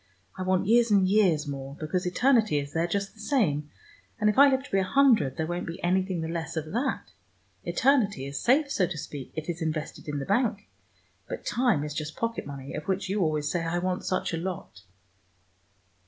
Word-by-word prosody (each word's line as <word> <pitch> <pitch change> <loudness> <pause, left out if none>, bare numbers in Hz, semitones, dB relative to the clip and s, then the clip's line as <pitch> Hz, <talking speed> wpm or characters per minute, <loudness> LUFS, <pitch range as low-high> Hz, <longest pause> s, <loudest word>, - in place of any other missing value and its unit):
I 185 - -6
want 185 +1 +1
years 235 +3 +4
and 195 -3 +4
years 185 -7 +3
more, 135 -1 -6
because 180 +4 -2
eternity 220 - +3
is 140 0 -4
there 165 +1 +1
just 200 +2 -2
the 220 - -21
same, 180 - 0 0.5
and 210 -1 +4
if - - -8
I 280 0 +9
live 265 -1 +1
to - - -13
be 195 - +3
a - - +2
hundred 220 - +3
there 160 - 0
won't 175 +2 -3
be 165 +1 -5
anything 185 0 +1
the 160 - -3
less 165 0 -4
of 155 0 -3
that. 260 +5 -2 0.5
Eternity 220 - +2
is 140 0 -4
safe, 280 +3 +3
so 185 -8 +2
to 165 - -5
speak: 145 -3 -7
it 155 -1 -5
is 175 0 -4
invested 155 -1 -4
in 145 -1 -3
the 135 - -3
bank, 210 -1 0 0.6
but - - -6
time 235 - +2
is 150 0 -4
just 155 0 -4
pocket 230 -8 -2
money, 140 -1 -7
of 150 - -5
which 190 0 -1
you 200 +1 0
always 155 -3 0
say 175 -2 -1
I 165 +1 -1
want 180 +1 -1
such 185 - -1
a - - 0
lot. 175 - -6
180 Hz, 215 wpm, -27 LUFS, 155-210 Hz, 0.6 s, I